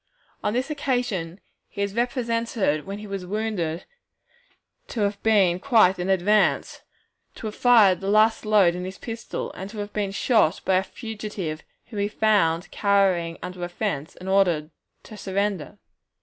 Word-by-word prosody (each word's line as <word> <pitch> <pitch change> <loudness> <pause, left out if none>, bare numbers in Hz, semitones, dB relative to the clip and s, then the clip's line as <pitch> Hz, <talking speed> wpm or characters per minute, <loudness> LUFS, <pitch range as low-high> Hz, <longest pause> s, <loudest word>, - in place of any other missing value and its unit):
On 210 - 0
this 255 +5 -1
occasion 245 - -2 0.3
he 200 - -3
is 200 -1 -3
represented 230 - -1
when 200 +1 -5
he 210 - -9
was 195 -2 -5
wounded 185 -4 -3 1.0
to 225 - -4
have 200 0 -1
been 195 -5 +3
quite 215 -6 +4
in 180 +2 -2
advance, 195 +3 +2 0.5
to - - -9
have 215 - -4
fired 215 -7 +5
the 195 - -4
last 215 +2 +4
load 210 -5 +4
in 180 +1 -5
his 185 +1 -6
pistol, 230 -1 -5
and 190 +1 -7
to 215 - -10
have 205 0 -5
been 205 -2 -1
shot 200 -4 +2
by 190 - +3
a 190 - +1
fugitive 205 -7 -6 0.3
whom 215 - -5
he 200 - +1
found 200 -6 +1
cowering 190 -5 +2
under 180 0 -6
a 175 - -3
fence, 175 -6 -3
and 185 - -10
ordered 175 -5 +2 0.3
to 215 - -11
surrender. 200 -3 -2
200 Hz, 165 wpm, -24 LUFS, 180-215 Hz, 1.0 s, fired